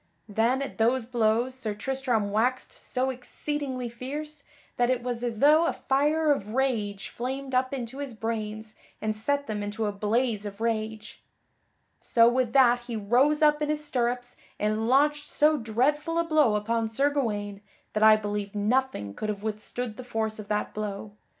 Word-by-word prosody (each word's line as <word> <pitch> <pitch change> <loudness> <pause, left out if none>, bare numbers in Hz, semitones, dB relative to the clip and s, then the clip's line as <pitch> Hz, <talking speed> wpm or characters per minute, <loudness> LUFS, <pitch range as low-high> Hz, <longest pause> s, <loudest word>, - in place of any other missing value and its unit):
Then, 230 +6 +1
at 270 - -8
those 235 +2 +2
blows 235 +1 +1
Sir 230 -5 -3
Tristram 240 -2 -1
waxed 245 +5 0
so 260 +1 -2
exceedingly 260 0 -4
fierce 285 +6 -6 0.3
that 245 0 +2
it 250 -2 0
was 245 -1 -3
as 235 -2 -2
though 310 +4 +6
a - - 0
fire 300 +3 +2
of 215 -5 -1
rage 215 -7 -1
flamed 265 +2 -5
up 255 +1 +2
into 260 0 -5
his 275 -5 -5
brains 220 -1 -4 0.3
and 215 0 -1
set 285 +6 0
them 210 -4 -3
into 205 +2 -3
a 205 - 0
blaze 215 +2 0
of 205 -1 -7
rage. 220 -1 -3 0.8
So 230 -1 +4
with 245 -1 +2
that 245 -3 +5
he 240 -1 -5
rose 250 +9 +3
up 300 0 +4
in 300 - 0
his 300 0 -1
stirrups 245 -3 -1 0.2
and 215 +1 0
launched 295 +3 +3
so 305 +1 +3
dreadful 290 +8 0
a 335 - +3
blow 305 -9 +3
upon 225 +2 0
Sir 275 +6 +1
Gawaine 205 -7 -2 0.3
that 215 - -1
I 220 0 +8
believe 205 -1 -4
nothing 210 - 0
could 215 - -4
have 205 -1 -4
withstood 220 +2 -4
the 255 - -7
force 220 -3 -2
of 210 - -8
that 210 0 -1
blow. 210 0 -5
240 Hz, 175 wpm, -27 LUFS, 215-270 Hz, 0.8 s, I